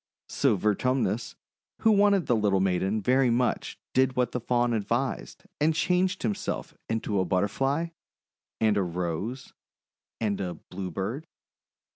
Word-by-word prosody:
So 135 Hz, -6 st, +2 dB
Vertumnus, 115 Hz, +3 st, 0 dB, 0.5 s
who 225 Hz, -, +5 dB
wanted 200 Hz, -3 st, +4 dB
the 120 Hz, -, +2 dB
little 105 Hz, -3 st, +2 dB
maiden 95 Hz, +3 st, +1 dB
very 130 Hz, +2 st, +4 dB
much, 120 Hz, +1 st, 0 dB, 0.2 s
did 130 Hz, 0 st, +3 dB
what 125 Hz, -1 st, +1 dB
the 125 Hz, -, -2 dB
Faun 120 Hz, 0 st, +1 dB
advised, 115 Hz, +5 st, -2 dB, 0.2 s
and 155 Hz, +2 st, +3 dB
changed 180 Hz, +2 st, +1 dB
himself 105 Hz, -4 st, -2 dB, 0.2 s
into 110 Hz, -3 st, 0 dB
a -, -, +3 dB
Butterfly, 135 Hz, -, 0 dB, 0.7 s
and 110 Hz, -2 st, +3 dB
a -, -, +3 dB
Rose, 90 Hz, +8 st, -3 dB, 0.7 s
and 105 Hz, -3 st, -1 dB
a 90 Hz, -2 st, -3 dB
Bluebird. 95 Hz, -, -5 dB
115 Hz, 130 wpm, -27 LUFS, 100-135 Hz, 0.7 s, who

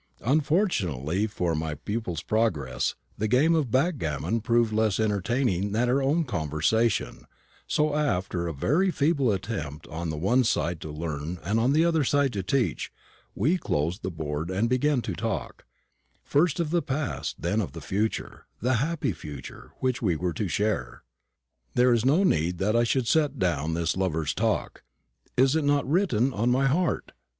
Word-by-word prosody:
Unfortunately 110 Hz, -, +1 dB
for 90 Hz, -5 st, -1 dB
my 80 Hz, -1 st, -2 dB
pupil's 90 Hz, -2 st, -4 dB
progress, 90 Hz, -, 0 dB, 0.2 s
the 110 Hz, -, +1 dB
game 135 Hz, +9 st, +4 dB
of 155 Hz, -6 st, +1 dB
backgammon 115 Hz, -, 0 dB
proved 115 Hz, -1 st, +2 dB
less 110 Hz, -2 st, +1 dB
entertaining 105 Hz, -1 st, 0 dB
than 120 Hz, +3 st, +2 dB
our 130 Hz, +3 st, +2 dB
own 150 Hz, +5 st, +2 dB
conversation, 100 Hz, -, 0 dB, 0.4 s
so, 150 Hz, 0 st, +1 dB
after 90 Hz, -, 0 dB
a -, -, -2 dB
very 150 Hz, -, +1 dB
feeble 145 Hz, -6 st, +2 dB
attempt 80 Hz, -7 st, -4 dB
on 85 Hz, +1 st, -4 dB
the 80 Hz, -, -3 dB
one 120 Hz, +11 st, +3 dB
side 85 Hz, -8 st, 0 dB
to 80 Hz, -, -6 dB
learn 75 Hz, +2 st, -4 dB
and 105 Hz, +6 st, +1 dB
on 120 Hz, +4 st, +3 dB
the 155 Hz, +3 st, +4 dB
other 165 Hz, -3 st, +2 dB
to 135 Hz, -6 st, +1 dB
teach, 120 Hz, +7 st, -1 dB, 0.4 s
we 155 Hz, -, +2 dB
closed 80 Hz, -, -1 dB
the 95 Hz, -, -3 dB
board 80 Hz, -1 st, -4 dB
and 100 Hz, +5 st, 0 dB
began 130 Hz, 0 st, +2 dB
to 100 Hz, -, -3 dB
talk; 110 Hz, +3 st, -4 dB, 0.6 s
first 155 Hz, +3 st, +2 dB
of 160 Hz, -3 st, -1 dB
the 175 Hz, 0 st, +2 dB
past, 140 Hz, 0 st, -3 dB
then 105 Hz, +6 st, 0 dB
of 95 Hz, -, -5 dB
the 80 Hz, -, -7 dB
future, 100 Hz, +8 st, -3 dB
the 125 Hz, +4 st, +1 dB
happy 160 Hz, -, -1 dB
future, 75 Hz, -4 st, -9 dB
which 130 Hz, -1 st, 0 dB
we 90 Hz, -8 st, +1 dB
were 85 Hz, +2 st, -2 dB
to 105 Hz, -, -2 dB
share. 90 Hz, -, -2 dB, 0.7 s
There 125 Hz, 0 st, +5 dB
is 115 Hz, -2 st, +2 dB
no 150 Hz, +9 st, +4 dB
need 85 Hz, -, +1 dB
that 105 Hz, +5 st, +1 dB
I 120 Hz, 0 st, +4 dB
should 125 Hz, 0 st, 0 dB
set 150 Hz, 0 st, +2 dB
down 80 Hz, -, 0 dB
this 85 Hz, -1 st, 0 dB
lovers' 80 Hz, -5 st, -1 dB
talk. -, -, -1 dB, 0.6 s
Is 135 Hz, +3 st, +4 dB
it 160 Hz, -, +1 dB
not 145 Hz, -2 st, +2 dB
written 135 Hz, -, +2 dB
on 115 Hz, +4 st, +1 dB
my 130 Hz, +2 st, +3 dB
heart? 160 Hz, +6 st, 0 dB
110 Hz, 170 wpm, -26 LUFS, 85-135 Hz, 0.7 s, There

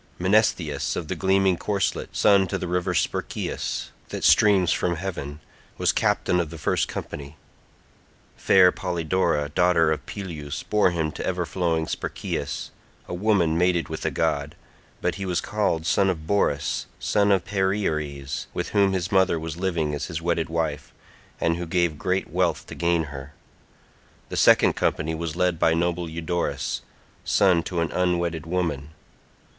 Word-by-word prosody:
Menesthius 90 Hz, -6 st, +1 dB
of 80 Hz, -3 st, -4 dB
the -, -, -1 dB
gleaming 95 Hz, -1 st, +2 dB
corslet, 100 Hz, 0 st, -2 dB
son 100 Hz, -2 st, +4 dB
to -, -, -2 dB
the 90 Hz, -, -4 dB
river 90 Hz, +1 st, -1 dB
Spercheius -, -, -2 dB, 0.2 s
that -, -, -5 dB
streams 95 Hz, -5 st, +5 dB
from 85 Hz, -1 st, 0 dB
heaven, 80 Hz, -5 st, -5 dB, 0.4 s
was -, -, +3 dB
captain 90 Hz, -, +1 dB
of 85 Hz, -3 st, -1 dB
the 85 Hz, -, -8 dB
first 75 Hz, -, 0 dB
company. 70 Hz, +1 st, -7 dB, 1.0 s
Fair 90 Hz, -1 st, +5 dB
Polydora 85 Hz, -4 st, 0 dB
daughter 90 Hz, -3 st, +3 dB
of 80 Hz, -, -2 dB
Peleus 80 Hz, -7 st, -6 dB
bore 105 Hz, -3 st, +3 dB
him 80 Hz, -3 st, -1 dB
to -, -, -6 dB
ever 90 Hz, -1 st, -1 dB
flowing 85 Hz, -2 st, 0 dB
Spercheius—a -, -, -5 dB
woman 90 Hz, -4 st, +2 dB
mated 90 Hz, -4 st, +2 dB
with -, -, -5 dB
a -, -, +1 dB
god—but 75 Hz, +4 st, -3 dB
he -, -, -2 dB
was 90 Hz, -2 st, 0 dB
called 100 Hz, -6 st, -1 dB
son 95 Hz, +2 st, +3 dB
of 80 Hz, -4 st, -3 dB
Borus 75 Hz, -7 st, 0 dB
son 100 Hz, -1 st, +2 dB
of 95 Hz, -3 st, +2 dB
Perieres, 80 Hz, -9 st, -2 dB
with -, -, -2 dB
whom 100 Hz, -2 st, +3 dB
his 95 Hz, -1 st, -2 dB
mother 95 Hz, -3 st, +3 dB
was 80 Hz, -1 st, -5 dB
living 85 Hz, -5 st, -1 dB
as 75 Hz, -, -3 dB
his 85 Hz, -3 st, -4 dB
wedded 85 Hz, -1 st, -1 dB
wife, 80 Hz, -3 st, -2 dB, 0.5 s
and 85 Hz, 0 st, +1 dB
who 85 Hz, 0 st, -5 dB
gave 85 Hz, -3 st, 0 dB
great 95 Hz, +1 st, 0 dB
wealth -, -, 0 dB
to -, -, -9 dB
gain 85 Hz, -1 st, +1 dB
her. 70 Hz, -1 st, -9 dB, 1.0 s
The -, -, -5 dB
second -, -, +5 dB
company 80 Hz, +1 st, -1 dB
was 80 Hz, -1 st, -4 dB
led 90 Hz, -2 st, +1 dB
by 80 Hz, 0 st, +3 dB
noble 85 Hz, 0 st, -1 dB
Eudorus, 85 Hz, +2 st, -2 dB, 0.4 s
son 95 Hz, -4 st, +3 dB
to 85 Hz, -2 st, -2 dB
an 85 Hz, -, -1 dB
unwedded 85 Hz, -3 st, 0 dB
woman. 80 Hz, -5 st, -2 dB
85 Hz, 155 wpm, -24 LUFS, 80-95 Hz, 1.0 s, streams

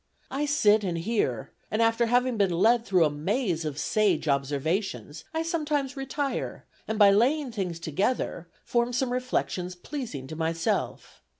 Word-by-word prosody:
I 290 Hz, +2 st, -1 dB
sit 220 Hz, -8 st, +4 dB
and 175 Hz, -3 st, -1 dB
hear, 165 Hz, -, -1 dB, 0.2 s
and 215 Hz, -, -1 dB
after 230 Hz, +1 st, +3 dB
having 245 Hz, +1 st, +2 dB
been 200 Hz, -3 st, +2 dB
led 225 Hz, +7 st, +3 dB
through 185 Hz, -4 st, +4 dB
a 150 Hz, -, +1 dB
maze 170 Hz, -, -1 dB
of 150 Hz, -2 st, -4 dB
sage 180 Hz, 0 st, +1 dB
observations, 145 Hz, -, -1 dB
I 320 Hz, 0 st, -1 dB
sometimes 300 Hz, -4 st, -1 dB
retire, 275 Hz, +1 st, -3 dB, 0.2 s
and 220 Hz, -, -2 dB
by 205 Hz, -2 st, +7 dB
laying 260 Hz, +6 st, +2 dB
things 185 Hz, -6 st, -3 dB
together, 170 Hz, -, -1 dB, 0.2 s
form 240 Hz, 0 st, +1 dB
some 250 Hz, 0 st, 0 dB
reflections 190 Hz, -8 st, -2 dB
pleasing 200 Hz, -, -6 dB
to 155 Hz, -, -7 dB
myself. 165 Hz, +1 st, -2 dB
210 Hz, 155 wpm, -27 LUFS, 165-250 Hz, 0.2 s, by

